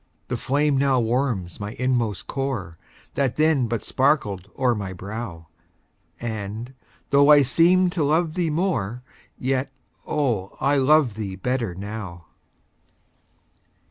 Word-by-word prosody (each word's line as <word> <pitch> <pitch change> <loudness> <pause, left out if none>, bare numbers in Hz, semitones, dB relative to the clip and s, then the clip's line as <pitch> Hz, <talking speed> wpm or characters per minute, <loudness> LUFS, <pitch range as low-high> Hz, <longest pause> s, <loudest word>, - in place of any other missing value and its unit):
The - - -1
flame 145 0 +1
now 135 -2 +3
warms 115 -7 -1
my 105 +1 -5
inmost 120 -5 -1
core, 130 - -3 0.4
That 135 -3 0
then 155 -5 +3
but 115 -1 -2
sparkled 105 - +1
o'er 130 -2 +3
my 100 -4 -4
brow, 95 -3 -7 0.7
And, 110 +2 -5 0.4
though 140 +1 +6
I 145 -1 +8
seemed 175 +7 +4
to 170 -4 0
love 155 +2 +2
thee 175 -2 0
more, 125 - -1 0.3
Yet, 130 +1 -1 0.4
oh, 120 -11 -1
I 140 +2 +2
love 140 -2 +4
thee 100 -3 -5
better 115 -2 -2
now. 100 -4 -7
125 Hz, 125 wpm, -24 LUFS, 105-140 Hz, 0.7 s, I